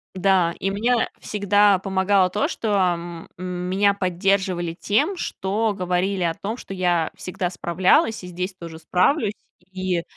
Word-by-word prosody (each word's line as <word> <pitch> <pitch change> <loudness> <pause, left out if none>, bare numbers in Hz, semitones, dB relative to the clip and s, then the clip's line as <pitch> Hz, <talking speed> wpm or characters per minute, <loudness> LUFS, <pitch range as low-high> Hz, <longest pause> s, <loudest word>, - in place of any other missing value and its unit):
Да, 185 -3 +3
и 195 - -1
мне 230 +4 +1
всегда 205 -1 +3
помогало 190 0 +2
то, 205 +3 0
что 220 - -3
м 175 -2 -1
меня 185 +3 0
поддерживали 185 -2 0
тем, 220 - +1
что 210 - -1
говорили 180 +1 -1
о 165 -1 0
том, 215 +4 -4
что 195 - -8
я 175 -3 +1
всегда 180 -1 -3
справлялась 185 +4 +2
и - - -7
здесь 180 +2 -4
тоже 165 -3 -9
справлюсь. 200 - +1 0.4
И, 185 -2 -2
185 Hz, 140 wpm, -23 LUFS, 180-200 Hz, 0.4 s, Да